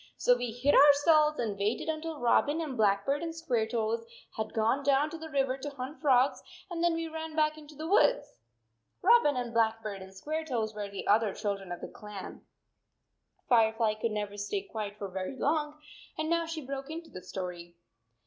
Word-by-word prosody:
So 245 - +4
we 245 0 -3
hid 245 +5 +1
ourselves 300 +2 +6
and 210 -4 -2
waited 210 +8 -1
un 315 -1 -2
til 325 -1 -5
Robin 285 +6 +3
and 305 -5 -3
Blackbird 215 +6 +2
and 335 -1 -3
Squaretoes 230 -7 -1 0.3
had 220 0 -3
gone 225 +5 +1
down 285 +2 +3
to 330 - -6
the 320 0 -7
river 270 -3 0
to 290 - -4
hunt 275 +1 -7
frogs, 265 -3 +3 0.3
and 340 -1 -2
then 345 -1 +3
we 330 0 -2
ran 320 0 -6
back 305 -1 +2
into 305 -1 -13
the 310 +2 -5
woods." 415 +6 +2 0.6
Robin 370 - +5
and 245 -2 -3
Blackbird 220 -3 0
and 190 0 -10
Squaretoes 250 -1 -3
were 205 -1 -5
the 200 -1 -6
other 215 -1 +3
children 200 -3 -3
of 175 - -5
the - - -5
clan. 210 -2 -9 1.1
Firefly 225 -2 +3
could 215 +2 -2
never 205 -1 -3
stay 295 - -2
quiet 215 - -6
for 200 - -4
very 190 +6 -5
long 300 +1 0 0.4
and 310 +1 -2
now 335 -1 +1
she 320 -3 -5
broke 275 +1 -5
into 325 +1 -7
the 185 - -8
story. 180 -2 -7
255 Hz, 185 wpm, -30 LUFS, 215-310 Hz, 1.1 s, ourselves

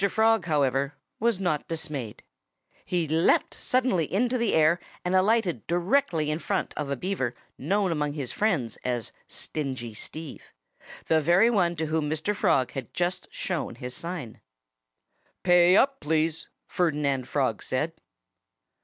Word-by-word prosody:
Frog, 225 0 +3
however, 140 -2 +1 0.2
was 230 -3 +1
not 175 -6 -1
dismayed. 145 -9 -4 0.6
He 175 -3 0
leaped 160 +3 +2
suddenly 250 - 0
into 245 +6 +1
the 235 -4 +1
air 160 +2 +4 0.3
and 180 - 0
alighted 185 - +2
directly 175 - +1
in 155 - -2
front - - -2
of 150 -2 -3
a 140 - 0
Beaver 130 -6 -2 0.2
known 195 +5 0
among 150 -2 -1
his 140 -5 -4
friends 175 - 0
as 120 -3 -3 0.2
Stingy 130 -6 -5
Steve 155 +7 -8 0.5
the 160 -1 +3
very 175 +9 +4
one 175 -6 +2
to 160 0 -2
whom 155 -1 -1
Mr. 160 +7 -1
Frog 130 -8 +2
had 135 - -6
just 180 +1 -1
shown 170 -9 -3
his 125 +1 -6
sign. 165 -9 -6 1.0
"Pay 175 +1 +6
up, 275 0 +3
please!" 160 +1 0 0.2
Ferdinand 145 -7 0
Frog - - 0
said. - - -1
160 Hz, 140 wpm, -27 LUFS, 145-185 Hz, 1.0 s, Pay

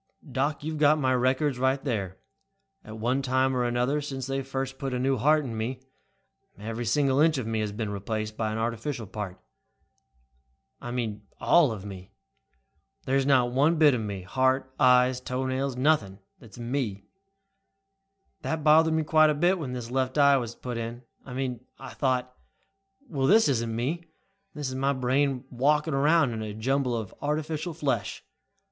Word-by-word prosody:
"Doc, 140 +3 -1
you've 155 0 -4
got 150 +1 +5
my 130 -3 +1
records 130 +2 +1 0.2
there. 100 -9 -3 0.7
At 110 - -9
one 125 +5 0
time 130 0 +1
or 125 - +1
another, 125 +4 0
since 135 -3 -5
they 135 0 -2
first 135 0 -4
put 135 -3 -3
a - - -1
new 135 +1 +1
heart 150 +5 +3
in 115 -3 -5
me, 120 +4 -3 0.8
every 115 +3 -5
single 135 +3 +2
inch 160 0 +4
of 130 - -3
me 110 0 -2
has 105 -1 -2
been 105 0 -4
replaced 110 +2 -4
by 110 -1 -2
an 110 - -3
artificial 115 +2 -3
part. 100 -2 -6 1.4
I 120 - -6
mean 110 -4 -4
all 165 -7 +4
of 105 -3 -6
me. 95 -2 -9 1.0
There's 135 +1 +1
not 125 -3 +4
one 145 +6 +3
bit 155 -3 +5
of 120 - -1
me, 100 -3 -5
heart, 130 +5 0
eyes, 125 0 +5
toenails, 130 +1 -2
nothing, 130 -9 +1 0.2
that 115 - -15
is - - -15
me. 120 -5 -3 1.4
That 160 -1 -3
bothered 160 +1 +5
me 160 - +1
quite 155 0 +5
a 150 - +1
bit 175 +5 +2
when 135 -6 -4
this 120 -1 -6
left 130 +1 -1
eye 140 -1 +6
was 120 -3 -4
put 120 -2 -5
in. 115 +2 -6 0.2
I 125 - -7
mean 125 -2 -3
I - - -9
thought, 125 -2 -1 0.7
'Well, 135 - -1
this 220 +3 +5
isn't 115 -4 0
me. 150 +9 -2 0.5
This 145 -2 -3
is 130 - -4
my 135 +2 +1
brain 130 +1 0
walking 150 +5 +1
around 145 0 +3
in 110 - -4
a 105 -1 -5
jumble 125 +2 0
of 110 -4 -6
artificial 155 +2 -2
flesh.' 150 -4 -2
130 Hz, 175 wpm, -27 LUFS, 115-145 Hz, 1.4 s, eye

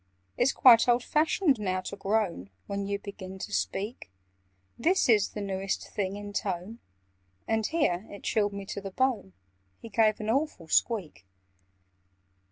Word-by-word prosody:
"It's 265 - +3
quite 240 -4 +7
old 240 0 +3
fashioned 305 - +2
now 185 -2 -1
to 195 - -6
groan 195 - -1 0.2
When 200 0 -3
you 200 0 -1
begin 190 -2 -9
to 190 - -7
speak: 100 - -3 0.7
This 355 +10 +2
is 215 -4 +4
the 210 - -6
newest 195 -1 -3
thing 195 -1 -2
in 205 0 -7
tone—" 195 +4 -3 0.7
And 220 -1 +1
here 225 - 0
(it 200 - -10
chilled 205 -2 +1
me 200 0 -6
to 200 - -5
the 195 - -6
bone) 235 - -1 0.4
He 230 - -11
gave 215 +1 +3
an 215 - -5
awful 265 - -1
squeak. 190 - 0
205 Hz, 155 wpm, -28 LUFS, 190-230 Hz, 0.7 s, quite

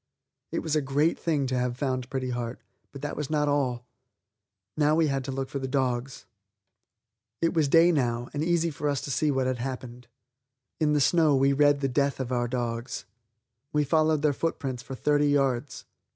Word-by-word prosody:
It - - -2
was 155 -1 -1
a 155 - +3
great 145 +4 +1
thing 150 -5 0
to 130 -1 -1
have 125 0 -1
found 130 -3 -2
Pretty 130 -2 -2
Heart, 120 0 -4 0.3
but 140 0 -10
that 145 - -3
was 150 -3 -4
not 150 -1 +1
all. 130 -4 0 0.9
Now 150 0 +3
we 165 0 +3
had 135 -1 -1
to 135 - -3
look 135 0 -3
for 140 - -4
the 130 - -3
dogs. 130 -1 -2 1.1
It 165 - +1
was 160 -3 +2
day 165 +4 +6
now 120 -5 0
and 145 +1 -1
easy 170 0 +1
for 145 +1 -2
us 140 -2 -1
to 140 - -5
see 150 +3 +1
what 135 -2 +1
had 130 -1 -1
happened. 125 -1 -6 0.7
In 150 -2 +2
the 150 - +2
snow 155 0 +4
we 135 +1 +3
read 145 0 +3
the 135 - +1
death 140 +1 0
of 130 -1 -3
our 120 -1 0
dogs. 120 0 -3 0.7
We 150 0 +3
followed 155 +1 +2
their 150 -2 +3
footprints 135 -5 -3
for 135 +1 -7
thirty 145 +2 +2
yards. 135 -2 0
140 Hz, 195 wpm, -27 LUFS, 130-150 Hz, 1.1 s, day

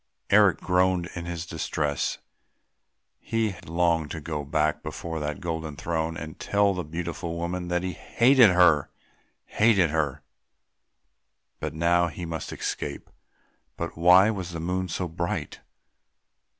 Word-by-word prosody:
Eric - - +5
groaned 90 -1 +1
in 85 -1 -6
his 85 -1 -4
distress; 75 -3 -2 1.0
he 115 -3 -1
longed 85 -2 +1
to 80 - -5
go 75 -1 -4
back 75 +1 0
before 80 -1 -5
that 75 -1 -3
golden 80 -3 -4
throne 80 +1 -2
and 80 +1 -8
tell 100 -1 +2
the 90 -1 -3
beautiful 85 +1 -5
woman 90 +1 -3
that 90 0 -1
he 95 - -2
hated 120 +5 +5
her... 90 -5 +4 0.6
hated 100 -7 +3
her!... 75 -4 -1 1.4
But - - -4
now 85 +2 +3
he 85 +1 -6
must 80 -1 -5
escape 70 - -5 0.7
but - - -4
why 90 +5 +6
was 95 -4 -5
the 85 - -4
moon 90 +3 -2
so 90 +1 -3
bright? 85 0 -4
85 Hz, 135 wpm, -26 LUFS, 80-90 Hz, 1.4 s, why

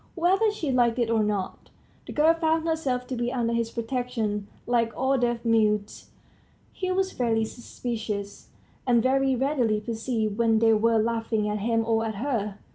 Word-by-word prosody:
Whether 380 +5 +3
she 335 -9 -3
liked 240 -2 +2
it 235 -2 +1
or 225 -1 +3
not, 205 -3 -3 0.4
the - - -6
girl 310 +2 +4
found 325 0 0
herself 275 -6 -1
to 255 - -4
be 240 0 -1
under 235 -2 -1
his 230 -1 0
protection. 230 -4 -3 0.2
Like 235 -1 +1
all 265 +1 +2
deaf 240 -2 -1
mutes, 210 -2 +1 0.6
he 370 -1 -3
was 380 0 0
very 225 -3 +1
suspicious, 220 -4 -5 0.4
and 235 -2 +4
very 270 0 +2
readily 250 -5 +1
perceived 220 -1 -2
when 225 -1 +3
they 225 0 +4
were 225 +1 +3
laughing 225 -1 0
at 210 0 -1
him 225 +2 0
or 225 0 +1
at 220 -1 -3
her. 210 -4 -2
235 Hz, 170 wpm, -26 LUFS, 220-260 Hz, 0.6 s, girl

